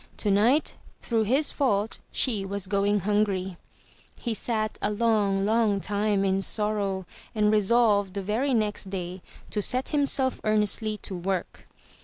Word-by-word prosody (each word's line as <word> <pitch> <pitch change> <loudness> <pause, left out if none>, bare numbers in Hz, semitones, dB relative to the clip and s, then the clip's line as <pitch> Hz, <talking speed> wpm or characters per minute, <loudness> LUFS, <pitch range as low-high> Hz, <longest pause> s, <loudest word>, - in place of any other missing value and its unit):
Tonight, 215 +8 +2 0.3
through 225 -2 0
his 270 +8 +2
fault, 220 -6 0
she 220 -7 +1
was 200 0 -3
going 200 +1 +1
hungry. 195 -3 0 0.6
He 235 - -2
sat 215 -1 -2
a - - +1
long, 205 -3 +1
long 215 -2 +2
time 205 0 0
in 190 0 +1
sorrow 200 -2 -1 0.3
and 210 -1 +3
resolved 210 -2 +3
the 200 - -3
very 240 +7 0
next 210 -3 -1
day 185 -1 -5 0.3
to 210 - -1
set 255 +5 0
himself 280 -3 0
earnestly 215 0 +1
to 190 - -4
work. 185 +1 -4
210 Hz, 140 wpm, -26 LUFS, 195-225 Hz, 0.6 s, and